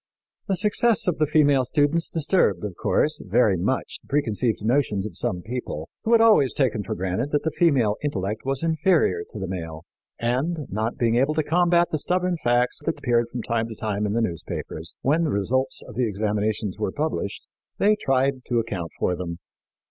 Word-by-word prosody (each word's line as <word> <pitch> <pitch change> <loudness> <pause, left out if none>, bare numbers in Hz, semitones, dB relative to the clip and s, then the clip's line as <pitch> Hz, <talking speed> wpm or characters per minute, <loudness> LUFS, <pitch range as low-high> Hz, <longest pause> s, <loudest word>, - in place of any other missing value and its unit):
"The 195 - +1
success 210 +3 +2
of 175 - 0
the 155 - +3
female 145 -3 +4
students 145 +5 +1
disturbed, 145 - +2
of 100 - -4
course, 150 - +1
very 105 0 +3
much 100 +10 -2
the - - -25
preconceived 115 -6 0
notions 115 -5 +1
of 110 - -7
some 90 -1 -2
people, 110 -10 -5
who 225 - -1
had 230 - +6
always 215 - +5
taken 120 -6 +1
for - - -4
granted 95 +9 -2
that 145 0 0
the 160 - 0
female 135 -11 +2
intellect 105 -6 -2
was 135 +2 -1
inferior 160 - +2
to - - -9
the 95 - -3
male; 80 -3 -6 0.3
and, 140 +7 -1
not 110 +4 -2
being 115 -1 +2
able 140 +5 +2
to 155 - +1
combat 175 +2 +3
the 155 - 0
stubborn 180 +2 0
facts 120 +1 +2
that - - -1
appeared 120 -1 +1
from 120 -1 -5
time 115 -1 -1
to 115 - -8
time 105 -1 -2
in 100 - -2
the 115 - +1
newspapers, 85 -4 -5
when 155 +5 +2
the 160 - 0
results 130 +6 -1
of 125 - -11
the 120 +1 0
examinations 105 -1 -1
were 105 -3 -1
published, 150 -8 -3 0.3
they 210 +2 +4
tried 135 -5 0
to 120 - -1
account 100 -7 -2
for 90 - 0
them." 85 -1 -5
120 Hz, 195 wpm, -24 LUFS, 105-150 Hz, 0.3 s, had